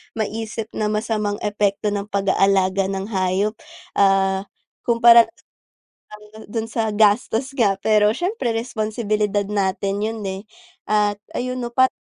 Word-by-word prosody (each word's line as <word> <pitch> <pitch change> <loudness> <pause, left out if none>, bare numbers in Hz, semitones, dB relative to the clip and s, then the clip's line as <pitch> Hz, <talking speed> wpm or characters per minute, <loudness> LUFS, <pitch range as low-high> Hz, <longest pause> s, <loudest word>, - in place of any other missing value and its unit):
maisip 220 0 -4
na 215 - -2
masamang 210 -1 -1
epekto 205 0 0
ng 200 0 -3
pag 195 -1 0
aalaga 195 0 +2
ng 195 +2 -4
hayop, 190 +2 0 0.5
ah, 195 0 +2 0.4
kumpara 235 -1 +7 1.3
dun 225 -1 -2
sa 220 -2 -1
gastos 220 +5 +2
nga 200 -5 +2
pero 210 0 +3
syempre 350 - -2
responsibilidad 215 -3 -1
natin 200 0 -1
yun, 220 0 -3
eh. 190 +1 -5 0.4
At 210 -1 +1 0.2
ayun 255 0 -3
pa 260 +1 +4
210 Hz, 120 wpm, -21 LUFS, 200-225 Hz, 1.3 s, kumpara